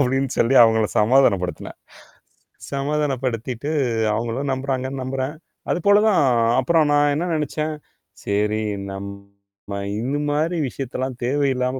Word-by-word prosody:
அப்படின்னு 135 0 +1
சொல்லி 120 +4 +3
அவுங்கள 110 -1 +4
சமாதானப்படுத்துனேன். 105 -6 +1 0.9
சமாதானப்படுத்திட்டு, 135 -3 -2 0.4
அவுங்களும் 120 +5 -2
நம்புறாங்கன்னு 130 0 -3
நம்புறேன். 130 +2 -3 0.4
அது - - +1
போல 205 +1 +6
தான் 205 -7 +4 0.4
அப்புறம் 155 +4 +3
நான் 145 0 +3
என்ன 165 +4 -1
நெனைச்சேன், 155 0 -2 0.5
"சரி, 105 +2 0 0.3
நம்ம 100 0 -9 0.2
இந்த 135 +5 -2
மாரி 155 +4 0
விஷயத்தல்லாம் 130 -1 -5
தேவையில்லாம 130 -1 0
130 Hz, 105 wpm, -22 LUFS, 115-145 Hz, 0.9 s, போல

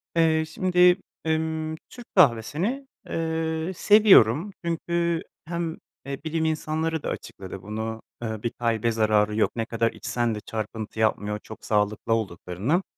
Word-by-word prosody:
Eee, 160 -1 +4
şimdi, 180 +2 +4 0.3
emm, 160 0 -1
Türk 245 -1 -11
kahvesini, 180 - +2 0.2
eee, 160 +1 -1
seviyorum, 195 - +6
çünkü 170 0 0 0.2
hem, 170 0 -3 0.3
eee, 140 0 -4
bilim 160 0 -1
insanları 160 0 -1
da - - -2
açıkladı 95 0 -7
bunu, 110 +3 -4 0.2
eee, 110 -2 -4
bir 120 - +1
kalbe 115 -1 0
zararı 105 -1 +2
yok, 110 - +2
ne 115 -1 -1
kadar 115 0 0
içsen 120 -2 -1
de - - -4
çarpıntı 110 0 -5
yapmıyor 105 -1 +1
çok 110 - -11
sağlıklı 105 +1 +1
olduklarını, 110 - -1
150 Hz, 135 wpm, -25 LUFS, 110-165 Hz, 0.3 s, seviyorum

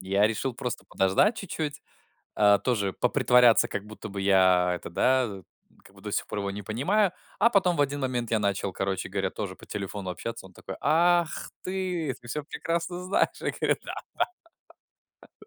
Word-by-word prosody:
я 100 +2 +3
решил 115 +3 -2
просто 125 -1 -4
подождать 95 - +3
чуть-чуть, 155 -6 -4 0.6
э, 100 -1 +6
тоже 100 -6 +1
попритворяться, 125 -2 +4
как 100 0 -4
будто 110 0 -9
бы 100 0 -5
я 95 -2 +4
это, 85 - -7
да, 120 -3 +1 0.4
как - - -18
бы, - - -16
до - - -6
сих - - -1
пор 105 - -4
его 100 - -2
не 100 +1 -6
понимаю. 180 - +1 0.3
А 235 - +5
потом 185 -5 +3
в - - +1
один 145 0 -2
момент 125 -3 -2
я 110 - +3
начал, 100 -1 -1
короче 95 -1 -2
говоря, 95 0 -1
тоже 100 -3 -5
по - - -15
телефону 100 -2 -5
общаться. 115 +3 -6
Он 95 - -16
такой: 95 +2 -8
"Ах, 170 +2 +2
ты! 180 -6 -2
Ты 120 - -14
всё 150 +5 -3
прекрасно 170 +3 -3
знаешь". 185 - +2
Я - - -1
говорю: - - +2
"Да, - - -5 1.5
да". 425 - -15
115 Hz, 180 wpm, -27 LUFS, 100-155 Hz, 1.5 s, э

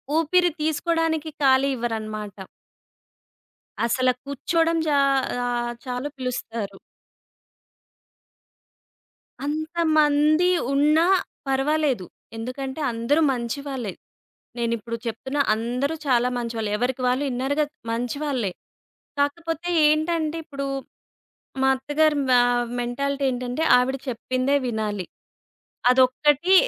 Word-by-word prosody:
ఊపిరి 350 +3 +3
తీసుకోడానికి 320 0 0
ఖాళీ 270 0 +4
ఇవ్వరన్నమాట. 215 -4 -4 1.5
అసల 255 +2 +2
కూర్చోవడం 330 +4 0
జ - - +2 0.6
ఆహ్, 240 0 -1
చాలు 250 +3 -3
పిలుస్తారు. 230 -5 -4 2.7
అంతమంది 310 +1 +2 0.2
ఉన్నా 305 +4 +4 0.4
పర్వాలేదు. 270 - +1 0.3
ఎందుకంటే 265 +5 -5
అందరూ 235 +7 +1
మంచి 235 +2 -3
వాళ్ళే. 245 -8 -4 0.6
నేనిప్పుడు 230 -1 -2
చెప్తున్నా 265 +5 -2
అందరూ 250 +7 -1
చాలా 250 -1 +3
మంచివాళ్ళు. 230 -3 -3
ఎవరికి 250 +3 -1
వాళ్ళు 255 +3 +1
ఇన్నర్‌గా 275 +5 0 0.3
మంచివాళ్ళే. 245 -1 -2 0.7
కాకపోతే 330 +4 -1 0.2
ఏంటంటే 315 +1 +1
ఇప్పుడు 275 -2 -5 1.0
మా 265 - +4
అత్తగారి 295 +3 +1
మ - - +5 0.5
మెంటాలిటీ 280 +3 -2
ఏంటంటే 250 +4 -3 0.2
ఆవిడ 260 +2 +1
చెప్పిందే 255 +3 0
వినాలి. 210 -5 -2 0.8
అదొక్కటి 275 +7 +4
265 Hz, 85 wpm, -24 LUFS, 240-305 Hz, 2.7 s, మ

